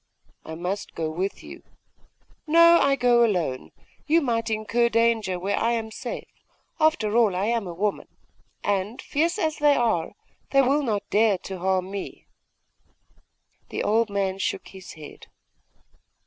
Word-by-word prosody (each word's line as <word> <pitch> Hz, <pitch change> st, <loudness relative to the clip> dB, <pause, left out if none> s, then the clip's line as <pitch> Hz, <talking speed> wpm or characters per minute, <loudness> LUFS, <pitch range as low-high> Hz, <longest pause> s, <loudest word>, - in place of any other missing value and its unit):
'I 160 Hz, -, -7 dB
must 180 Hz, +4 st, -4 dB
go 160 Hz, -1 st, -2 dB
with 185 Hz, +5 st, -4 dB
you.' -, -, -11 dB, 0.9 s
'No, 335 Hz, +2 st, +7 dB
I 275 Hz, 0 st, +3 dB
go 245 Hz, -2 st, +4 dB
alone. 175 Hz, -, -1 dB, 0.4 s
You 320 Hz, +2 st, +4 dB
might 235 Hz, -6 st, -1 dB
incur 225 Hz, +2 st, +1 dB
danger 230 Hz, -5 st, +1 dB
where 195 Hz, +3 st, -1 dB
I 230 Hz, +1 st, +1 dB
am 225 Hz, -1 st, -3 dB
safe. 240 Hz, +2 st, -6 dB, 0.5 s
After 310 Hz, -10 st, +2 dB
all, 225 Hz, -6 st, +3 dB
I 190 Hz, +2 st, 0 dB
am 230 Hz, -3 st, -1 dB
a 175 Hz, -, -6 dB
woman.... 205 Hz, +3 st, -2 dB, 0.6 s
And, 205 Hz, +4 st, -1 dB
fierce 330 Hz, +6 st, -1 dB
as 315 Hz, -6 st, -1 dB
they 295 Hz, -1 st, +4 dB
are, 220 Hz, -11 st, 0 dB, 0.4 s
they 275 Hz, 0 st, +4 dB
will 280 Hz, +3 st, +2 dB
not 215 Hz, -7 st, -2 dB
dare 215 Hz, -2 st, +3 dB
to 190 Hz, -2 st, -6 dB
harm 185 Hz, +1 st, 0 dB
me.' 200 Hz, -1 st, -7 dB, 1.4 s
The -, -, -3 dB
old 225 Hz, +1 st, +2 dB
man 195 Hz, -1 st, -2 dB
shook -, -, -3 dB
his 190 Hz, -1 st, -11 dB
head. 155 Hz, -2 st, -12 dB
220 Hz, 150 wpm, -24 LUFS, 190-245 Hz, 1.4 s, No